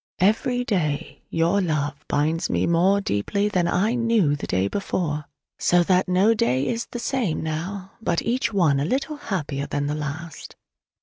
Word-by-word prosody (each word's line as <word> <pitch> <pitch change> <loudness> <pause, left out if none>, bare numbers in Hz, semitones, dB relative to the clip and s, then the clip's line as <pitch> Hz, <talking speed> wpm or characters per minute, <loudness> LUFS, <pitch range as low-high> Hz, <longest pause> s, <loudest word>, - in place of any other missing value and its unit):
Every 230 - +2
day 165 -8 -1
your 170 +5 +2
love 150 -4 -2
binds 160 +4 0
me - - +1
more 185 +4 +3
deeply 200 - 0
than 180 -4 +1
I 195 +6 +1
knew 230 -11 +2
the 145 - -6
day 95 +2 +1
before: 150 - -2 0.3
so 175 0 +4
that 185 +1 +2
no 190 +5 +4
day 140 - +1
is 235 0 -2
the - - -6
same 235 - -1
now, 185 +5 -4
but 170 - 0
each 245 +2 0
one 165 -9 +3
a 140 - 0
little 275 - -1
happier 150 - -3
than 145 0 -2
the 145 - -1
last. 150 +2 -6
175 Hz, 170 wpm, -24 LUFS, 150-205 Hz, 0.3 s, so